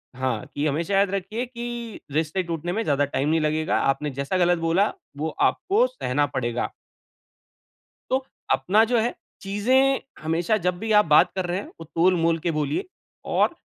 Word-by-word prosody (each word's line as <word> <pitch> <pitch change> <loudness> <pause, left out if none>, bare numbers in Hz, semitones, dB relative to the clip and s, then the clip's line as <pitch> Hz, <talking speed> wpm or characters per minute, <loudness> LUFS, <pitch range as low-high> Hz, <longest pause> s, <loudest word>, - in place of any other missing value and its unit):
हाँ, 130 -4 -2
कि 145 - -1
हमेशा 160 +6 -1
याद 195 0 +4
रखिए 200 +6 -2
कि 240 -2 -6
रिश्ते 160 +5 0
टूटने 170 0 -3
में 225 +2 -1
ज़्यादा 145 -1 +2
टाइम 140 +1 -1
नहीं 160 +1 +3
लगेगा। 155 +1 +1
आपने 145 +2 0
जैसा 140 +7 -2
गलत 175 -1 +3
बोला 170 +5 +2 0.3
वो 155 +2 -1 0.2
आपको 420 +6 +1
सहना 145 - -1
पड़ेगा। 120 -1 -1 1.4
तो 260 0 +1 0.3
अपना 210 +4 +3
जो 240 - +4
है 235 +2 0 0.3
चीज़ें 255 +7 +2 0.2
हमेशा 170 +7 +1
जब 180 0 +1
भी 225 +2 -3
आप 210 - +3
बात 150 -1 +5
कर 185 -1 -1
रहे 175 +1 -1
हैं - - -8
वो 165 - -7
तोल-मोल 165 -1 +3
के 170 - +2
बोलिए 150 - -1 0.5
और - - +3
175 Hz, 170 wpm, -24 LUFS, 150-215 Hz, 1.4 s, बात